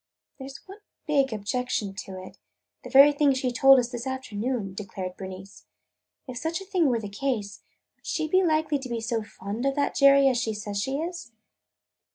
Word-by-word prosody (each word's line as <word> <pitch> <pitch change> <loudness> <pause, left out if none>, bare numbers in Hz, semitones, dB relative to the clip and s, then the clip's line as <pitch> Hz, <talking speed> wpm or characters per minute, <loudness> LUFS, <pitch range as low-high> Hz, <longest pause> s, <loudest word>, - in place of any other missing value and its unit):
"There 265 0 -7
's 275 - -9
one 390 +3 -11 0.3
big 280 -4 +2
objection 220 0 -2
to 190 -1 -8
it 185 - -12 0.2
– - - -55
the - - -8
very 280 +2 +8
thing 285 -1 +3
she 260 -1 -1
told 270 +2 +6
us 245 -1 0
this 240 0 -5
afternoon," 240 -4 -3
declared 190 -2 -6
Bernice. 190 0 -10 0.6
"If 250 -1 -6
such 325 +4 -2
a 390 - -10
thing 370 -5 +1
were 240 -3 +1
the 210 - -6
case, 205 -2 -3 0.4
would - - -18
she 315 -1 -1
be 370 +4 +3
likely 310 -3 +1
to 260 -1 -8
be 235 -1 -2
so 225 0 -2
fond 210 +2 -6
of 275 0 0
that 285 -1 0
Jerry 275 0 +6
as 255 -3 +2
she 220 -2 -2
says 205 -1 -4
she 265 +5 -2
is?" 335 -6 -6
255 Hz, 200 wpm, -26 LUFS, 210-280 Hz, 0.6 s, very